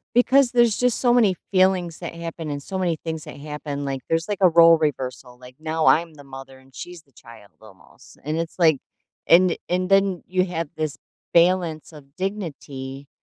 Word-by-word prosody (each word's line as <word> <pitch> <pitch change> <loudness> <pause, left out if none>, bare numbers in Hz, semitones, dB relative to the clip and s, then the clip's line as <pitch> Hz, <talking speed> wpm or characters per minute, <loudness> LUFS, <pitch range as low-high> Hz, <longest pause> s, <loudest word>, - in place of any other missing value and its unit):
because 260 +1 +4
there's 240 -3 +3
just 250 -2 +1
so 245 -2 +3
many 220 -6 +4 0.2
feelings 185 -3 +2
that 170 -1 -7
happen, 165 -1 -7
and 145 -1 -4
so 190 +4 -5
many 175 -3 0
things 160 -2 -5
that - - -10
happen. 150 -1 -6
Like, 135 -1 -3
there's, 165 +3 -1
like, 205 - -2
a 185 - +6
role 165 -1 +6
reversal, 130 -4 -4
like, 125 0 -14
now 160 0 -2
I'm 165 0 +3
the 145 - -14
mother, 135 0 -11
and 130 -1 -23
she's 175 +6 -9
the 140 - -33
child 115 -3 -16
almost. 100 -4 -18
And 155 +2 -2
it's, 165 +1 -5
like 160 -5 +4 0.5
and 175 +1 +5
and 180 +1 0
then 195 -2 +2
you 185 0 +1
have 165 -4 -4
this 155 -2 -3 0.4
balance 170 -2 +2
of 140 -2 -15
dignity, 145 -8 -6
165 Hz, 190 wpm, -22 LUFS, 140-185 Hz, 0.5 s, a